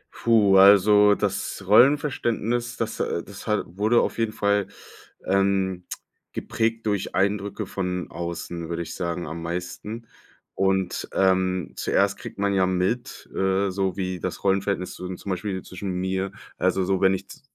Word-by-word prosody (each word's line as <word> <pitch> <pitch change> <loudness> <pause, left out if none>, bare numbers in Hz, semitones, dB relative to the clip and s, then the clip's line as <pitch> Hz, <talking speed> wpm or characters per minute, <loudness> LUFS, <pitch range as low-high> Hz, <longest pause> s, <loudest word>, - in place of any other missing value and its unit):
Puh, 105 -4 +4
also 105 +1 +7
das 100 0 -2
Rollenverständnis, 120 -1 +3
das, - - -3
äh 85 - -1
das 100 +3 -11
hat 105 0 +1
wurde 105 +7 +2
auf - - -1
jeden 115 -1 +1
Fall, 100 -2 +1 0.6
ähm, 95 -1 +1 0.5
geprägt 115 0 -1
durch 100 -4 -1
Eindrücke 100 +1 0
von 90 -2 -3
außen, 85 -1 -5
würde 85 0 -2
ich 85 0 -8
sagen, 85 -1 -3
am 80 +2 -6
meisten. 90 +7 -5 0.5
Und, 95 -1 0
ähm, 95 -2 +1
zuerst - - +1
kriegt - - -9
man 100 0 +1
ja 95 -1 +3
mit, 95 +7 -2
äh, 95 +1 +1
so 95 -1 -1
wie 95 -1 -2
das - - -5
Rollenverhältnis 95 -1 0
z 90 0 -6
zum 100 - -6
Beispiel 95 0 -3
zwischen 95 +1 -6
mir 95 +1 -1 0.3
also 95 +1 +1
so, 95 0 0
wenn 95 0 +4
ich - - -8
z - - -13
95 Hz, 155 wpm, -24 LUFS, 90-105 Hz, 0.6 s, also